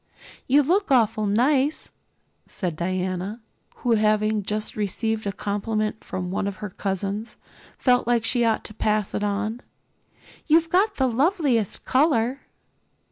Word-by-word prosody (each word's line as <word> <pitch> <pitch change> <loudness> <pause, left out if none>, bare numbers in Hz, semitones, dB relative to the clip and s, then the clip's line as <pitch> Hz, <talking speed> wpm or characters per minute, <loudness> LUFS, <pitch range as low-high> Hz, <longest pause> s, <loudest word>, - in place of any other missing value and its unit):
"You 285 +3 +5
look 370 +7 +1
awfully 225 -5 +2
nice," 270 +6 +1 0.6
said 175 -4 -3
Diana, 185 +4 -2 0.4
who 245 - -2
having 215 -1 +2
just 210 +2 -3
received 215 +1 -2
a - - 0
compliment 215 +2 -2
from 180 -1 -4
one 195 - -1
of 200 - -3
her 210 -1 -7
cousins, 200 +3 -3 0.4
felt 250 -2 +2
that 235 -2 +2
she 240 0 +2
ought 225 -1 +1
to - - -8
pass 215 -1 0
it - - -2
on. 210 +3 -2 0.9
"You've 325 +1 +3
got 395 +4 +3
the 265 - +1
loveliest 265 - +1
color." 260 -2 +2
220 Hz, 135 wpm, -24 LUFS, 205-255 Hz, 0.9 s, You